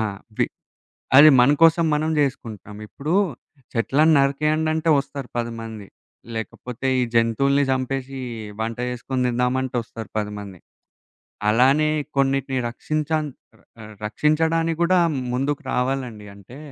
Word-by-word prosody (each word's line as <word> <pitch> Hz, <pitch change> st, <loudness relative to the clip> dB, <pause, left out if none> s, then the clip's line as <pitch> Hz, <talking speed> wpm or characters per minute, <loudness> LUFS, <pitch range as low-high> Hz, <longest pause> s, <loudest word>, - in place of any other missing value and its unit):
ఆ! -, -, +1 dB, 0.4 s
వి -, -, +3 dB, 0.7 s
అది 155 Hz, +2 st, +10 dB
మన 125 Hz, +3 st, +6 dB
కోసం 165 Hz, 0 st, +5 dB
మనం 155 Hz, +1 st, 0 dB
జేసుకుంటాం. 110 Hz, -7 st, -3 dB
ఇప్పుడు 150 Hz, +8 st, -4 dB, 0.6 s
చెట్లని 150 Hz, +7 st, +3 dB
నరికేయండంటే, 155 Hz, +3 st, +1 dB
ఒస్తారు 140 Hz, -2 st, -7 dB
10 120 Hz, 0 st, -2 dB
మంది. 110 Hz, -3 st, -8 dB, 0.5 s
లేకపోతే, 125 Hz, +3 st, -5 dB
ఈ -, -, +3 dB
జంతువుల్ని 135 Hz, +5 st, +3 dB
చంపేశి 130 Hz, +1 st, -3 dB, 0.4 s
వంట 115 Hz, 0 st, -3 dB
చేేసుకొని 125 Hz, +1 st, -3 dB
తిందామంటె 125 Hz, +1 st, 0 dB
వస్తారు 110 Hz, -2 st, -9 dB
10 105 Hz, 0 st, -3 dB
మంది. 95 Hz, -4 st, -10 dB, 0.9 s
అలానే 135 Hz, +7 st, +4 dB, 0.3 s
కొన్నిటిని 135 Hz, -1 st, +1 dB
రక్షించాం 155 Hz, +4 st, -2 dB, 0.6 s
ఆహ్, 110 Hz, 0 st, -10 dB
రక్షించడానికి 160 Hz, +7 st, +1 dB
గూడా 180 Hz, +1 st, +3 dB, 0.3 s
ముందుకు 140 Hz, +4 st, -1 dB
రావాలండి. 125 Hz, -4 st, -2 dB
అంటే 100 Hz, +7 st, -14 dB
135 Hz, 115 wpm, -22 LUFS, 115-150 Hz, 0.9 s, అది